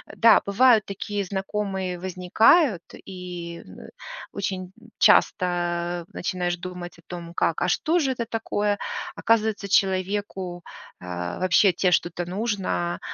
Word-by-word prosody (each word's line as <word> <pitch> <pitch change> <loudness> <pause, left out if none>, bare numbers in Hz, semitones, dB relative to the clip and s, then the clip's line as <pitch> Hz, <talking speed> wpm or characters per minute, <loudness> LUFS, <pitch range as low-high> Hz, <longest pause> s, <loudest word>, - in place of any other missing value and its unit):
Да, 230 -1 +6
бывают 220 +2 +4
такие 200 +1 -4
знакомые 190 -1 -3
возникают, 190 - +3 0.3
и 180 -2 -7
н - - -12
э, - - -11 0.4
очень 195 -2 -3 0.2
н 230 0 -18
часто 175 -2 +2
начинаешь 175 -1 -2
думать 180 0 -8
о - - -20
том, 170 -1 -8
как: 165 - 0
а 180 - +2
что 330 - +2
же 270 -4 +1
это 240 -2 -3
такое? 210 -2 -1 0.4
Оказывается, 220 -3 +1
человеку, 190 -2 0 0.4
а, 90 0 -5
вообще 185 +2 +4
от 180 - -1
тебя 180 - +2
что-то 175 0 0
нужно, 190 -3 -2
185 Hz, 135 wpm, -24 LUFS, 175-210 Hz, 0.4 s, Да